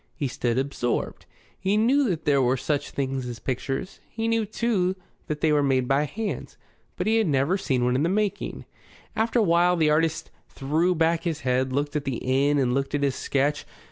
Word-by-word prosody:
He 140 Hz, -, -2 dB
stood 120 Hz, -2 st, -1 dB
absorbed. 130 Hz, -3 st, -2 dB, 0.3 s
He 195 Hz, +2 st, +1 dB
knew 255 Hz, +4 st, +3 dB
that 165 Hz, -3 st, -3 dB
there 140 Hz, -2 st, +3 dB
were 130 Hz, +1 st, +2 dB
such 145 Hz, +2 st, -2 dB
things 135 Hz, -2 st, -3 dB
as 120 Hz, -1 st, -6 dB
pictures. 135 Hz, +8 st, -4 dB
He 225 Hz, 0 st, -3 dB
knew, 225 Hz, -2 st, +1 dB
too, 200 Hz, -4 st, 0 dB, 0.3 s
that 150 Hz, -1 st, -4 dB
they 160 Hz, -, +3 dB
were 150 Hz, -1 st, +3 dB
made 130 Hz, -3 st, +1 dB
by 140 Hz, +3 st, +2 dB
hands. 215 Hz, +7 st, -5 dB, 0.4 s
But -, -, -2 dB
he 220 Hz, +1 st, +3 dB
had 220 Hz, -4 st, +2 dB
never 140 Hz, +4 st, +2 dB
seen 135 Hz, -10 st, 0 dB
one 125 Hz, 0 st, +1 dB
in 130 Hz, -, +1 dB
the 165 Hz, -, +2 dB
making. 205 Hz, +1 st, -2 dB, 0.5 s
After 225 Hz, +2 st, +1 dB
a 230 Hz, -, +4 dB
while 175 Hz, 0 st, +3 dB
the 155 Hz, -3 st, +2 dB
artist 160 Hz, +1 st, 0 dB, 0.2 s
threw 160 Hz, +6 st, 0 dB
back 165 Hz, 0 st, +2 dB
his 160 Hz, -3 st, -2 dB
head, 130 Hz, 0 st, 0 dB
looked 145 Hz, +2 st, -1 dB
at 150 Hz, -, -1 dB
the 135 Hz, -4 st, -2 dB
inn 140 Hz, +3 st, +1 dB
and 125 Hz, -3 st, +1 dB
looked 135 Hz, +2 st, -1 dB
at 145 Hz, -, -1 dB
his 140 Hz, -2 st, +2 dB
sketch. 140 Hz, +3 st, 0 dB
150 Hz, 205 wpm, -25 LUFS, 135-180 Hz, 0.5 s, a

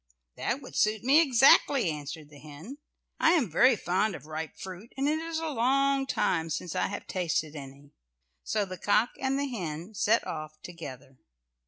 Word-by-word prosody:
"That -, -, -2 dB
would -, -, -11 dB
suit 215 Hz, +1 st, +1 dB
me 280 Hz, +6 st, +6 dB
exactly," 265 Hz, -, +5 dB
answered 150 Hz, 0 st, -7 dB
the 145 Hz, -, -14 dB
hen. 155 Hz, -, -11 dB, 0.4 s
"I 325 Hz, -, +5 dB
am 265 Hz, -, +1 dB
very 250 Hz, +9 st, +5 dB
fond 190 Hz, +1 st, 0 dB
of -, -, -11 dB
ripe 155 Hz, 0 st, -6 dB
fruit, 190 Hz, +4 st, -9 dB
and 275 Hz, +1 st, 0 dB
it 310 Hz, +1 st, +1 dB
is 330 Hz, 0 st, -4 dB
a 325 Hz, -, -3 dB
long 275 Hz, +1 st, +1 dB
time 165 Hz, -9 st, 0 dB
since 165 Hz, +2 st, -4 dB
I 185 Hz, -, +1 dB
have 205 Hz, -, -6 dB
tasted 160 Hz, -4 st, -2 dB
any." 140 Hz, 0 st, -11 dB, 0.5 s
So 210 Hz, -2 st, 0 dB
the 185 Hz, -2 st, -8 dB
cock 210 Hz, +5 st, +2 dB
and 270 Hz, +1 st, 0 dB
hen 185 Hz, -, -4 dB
set 215 Hz, +2 st, +2 dB
off 155 Hz, -1 st, -6 dB
together. 135 Hz, -7 st, -10 dB
195 Hz, 175 wpm, -28 LUFS, -, 0.5 s, me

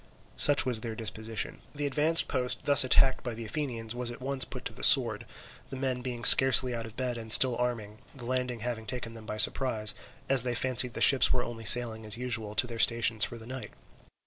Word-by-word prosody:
Such 145 Hz, -, +5 dB
was 120 Hz, -4 st, -2 dB
their 115 Hz, -1 st, -7 dB
disposition. 110 Hz, 0 st, -5 dB, 0.2 s
The 145 Hz, 0 st, -4 dB
advanced 150 Hz, +4 st, +2 dB
post 125 Hz, -2 st, -3 dB
thus 145 Hz, -1 st, +5 dB
attacked 130 Hz, +1 st, +1 dB
by 120 Hz, -2 st, -6 dB
the 115 Hz, 0 st, -9 dB
Athenians 115 Hz, -3 st, -6 dB
was 120 Hz, 0 st, -6 dB
at 120 Hz, -, -10 dB
once 130 Hz, +1 st, -3 dB
put -, -, -11 dB
to -, -, -6 dB
the -, -, -13 dB
sword, -, -, +2 dB, 0.4 s
the -, -, -8 dB
men 130 Hz, -1 st, -4 dB
being 125 Hz, -1 st, -7 dB
scarcely 130 Hz, -1 st, +6 dB
out 115 Hz, -1 st, -6 dB
of 110 Hz, -, -15 dB
bed 125 Hz, -2 st, -4 dB
and 110 Hz, -1 st, -11 dB
still 125 Hz, +2 st, +5 dB
arming, 115 Hz, -4 st, -5 dB, 0.2 s
the 125 Hz, -3 st, -10 dB
landing 125 Hz, -2 st, -4 dB
having 115 Hz, -2 st, -6 dB
taken 120 Hz, -2 st, -7 dB
them 110 Hz, -1 st, -14 dB
by 105 Hz, -, -6 dB
surprise, 110 Hz, -1 st, +1 dB, 0.3 s
as 135 Hz, -2 st, +3 dB
they 120 Hz, 0 st, -3 dB
fancied 125 Hz, -1 st, +2 dB
the -, -, -7 dB
ships 135 Hz, -2 st, +4 dB
were 125 Hz, -, -1 dB
only 115 Hz, -1 st, -9 dB
sailing 115 Hz, -1 st, +4 dB
as 105 Hz, +1 st, -2 dB
usual 110 Hz, -4 st, -6 dB
to -, -, +2 dB
their 115 Hz, -1 st, -9 dB
stations 115 Hz, -2 st, +2 dB
for 120 Hz, -, -10 dB
the 110 Hz, -, -14 dB
night. 130 Hz, +1 st, -9 dB
120 Hz, 220 wpm, -27 LUFS, 115-130 Hz, 0.4 s, scarcely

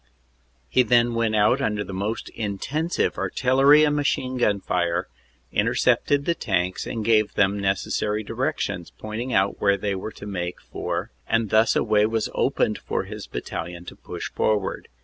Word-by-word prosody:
He 125 Hz, -, +3 dB
then 120 Hz, 0 st, +3 dB
went 115 Hz, -1 st, +1 dB
out 110 Hz, +6 st, +3 dB
under 105 Hz, -4 st, 0 dB
the 100 Hz, -, -8 dB
most 100 Hz, +4 st, -3 dB
intensive 125 Hz, -, -2 dB
artillery 135 Hz, +4 st, +4 dB
and 150 Hz, -1 st, +3 dB
machine 130 Hz, -3 st, 0 dB
gun 105 Hz, -5 st, +2 dB
fire, 85 Hz, -2 st, -1 dB, 0.4 s
intercepted 140 Hz, 0 st, +2 dB
the 170 Hz, -, +2 dB
tanks, 95 Hz, -, -1 dB
and 110 Hz, -3 st, -4 dB
gave 110 Hz, -2 st, +3 dB
them 100 Hz, 0 st, +2 dB
neces 95 Hz, -1 st, -1 dB
sary 105 Hz, +1 st, 0 dB
directions, -, -, -2 dB
pointing 110 Hz, +4 st, -5 dB
out 95 Hz, -1 st, +1 dB
where 100 Hz, -1 st, +3 dB
they 100 Hz, -1 st, -2 dB
were 95 Hz, +3 st, -5 dB
to -, -, -10 dB
make 90 Hz, -3 st, -4 dB
for -, -, -4 dB, 0.2 s
and 115 Hz, -3 st, +1 dB
thus 110 Hz, +1 st, +4 dB
a -, -, +2 dB
way 105 Hz, -1 st, +3 dB
was 115 Hz, 0 st, -1 dB
opened -, -, +1 dB
for -, -, -2 dB
his -, -, -8 dB
battalion 85 Hz, +1 st, -6 dB
to -, -, -9 dB
push -, -, -7 dB
forward. 105 Hz, -3 st, -1 dB
110 Hz, 170 wpm, -24 LUFS, 100-120 Hz, 0.4 s, artillery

